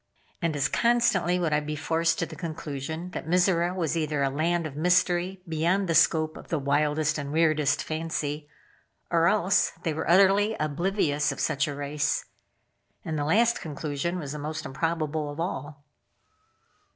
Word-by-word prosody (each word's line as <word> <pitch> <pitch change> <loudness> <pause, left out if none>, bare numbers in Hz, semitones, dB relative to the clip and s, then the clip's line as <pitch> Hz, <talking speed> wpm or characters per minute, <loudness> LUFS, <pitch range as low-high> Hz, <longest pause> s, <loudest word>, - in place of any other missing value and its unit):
And 165 -3 0
as 135 -2 +1
constantly 235 -3 +2
would 170 -4 0
I 150 - +3
be 150 0 -4
forced 165 +2 0
to 165 - 0
the 160 0 -10
conclusion 160 0 -5
that - - -6
Mizora 175 0 +2
was 170 -3 -1
either 155 -3 0
a 135 - +1
land 165 +4 0
of 145 -3 -6
mystery 180 +3 +1
beyond 170 +5 +1
the 165 - +1
scope 155 -1 +3
of - - -12
the 165 - -1
wildest 150 +2 +1
and 140 0 -5
weirdest 155 -3 +2
fancy, 155 -2 -3 0.6
or 170 -1 +4
else 195 -1 +2
they 160 - 0
were 155 - -3
utterly 195 +4 +5
oblivious 155 -1 0
of - - -7
such 145 -2 0
a 145 - -4
race. 145 +1 -1 0.8
And 160 - -3
the 145 -1 -1
last 230 +9 +3
conclusion 155 +2 -3
was 145 -5 -5
most 155 +2 -5
improbable 155 +1 -2
of 145 +2 -8
all. 145 -4 -4
160 Hz, 165 wpm, -27 LUFS, 150-175 Hz, 0.8 s, utterly